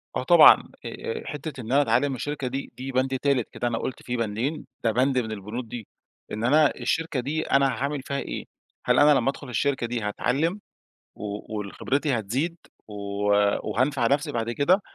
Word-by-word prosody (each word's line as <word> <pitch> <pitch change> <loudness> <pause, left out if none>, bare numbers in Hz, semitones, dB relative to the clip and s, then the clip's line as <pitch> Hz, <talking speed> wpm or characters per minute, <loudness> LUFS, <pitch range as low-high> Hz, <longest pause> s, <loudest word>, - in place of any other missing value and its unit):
آه - - -1
طبعًا. - - +7 0.2
آآ، 460 -1 -5
حتّة 150 -2 -6
إن 115 +2 -7
أنا 140 +2 +5
أتعلِّم 140 0 +2
من 135 - -2
الشركة 140 +1 -3
دي 135 +2 -4
دي 130 +1 -5
بند 130 +1 +1
تالت 140 -5 +1
كده، 120 - -3
أنا 115 -1 -1
قُلت 130 - -5
فيه 125 0 -3
بندين 115 +8 -2 0.2
ده 115 - +3
بند 130 +3 +2
من 110 -3 -3
البنود 110 +4 -5
دي، 115 -3 -7 0.4
إن 110 +2 -3
أنا 145 +4 +5
الشركة 150 +4 -1
دي 145 +6 -1
أنا 140 -2 +3
هاعمل 140 +3 -2
فيها 140 +1 -4
إيه؟ - - -5 0.4
هل - - +4
أنا 150 +1 +7
لمّا 130 +2 +1
أدخل 140 -1 -6
الشركة 130 0 0
دي 120 0 -2
هاتعلِّم؟ 145 - 0 0.6
و 105 +1 -6
وال 100 -2 -5
خبرتي 140 -2 0
هتزيد؟ 135 - -2 0.3
و 105 - -10 0.8
وهانفع 130 0 +1
نفسي 145 +3 +1
بعد 115 -1 -2
كده؟ 175 - +3
130 Hz, 190 wpm, -25 LUFS, 115-145 Hz, 0.8 s, طبعًا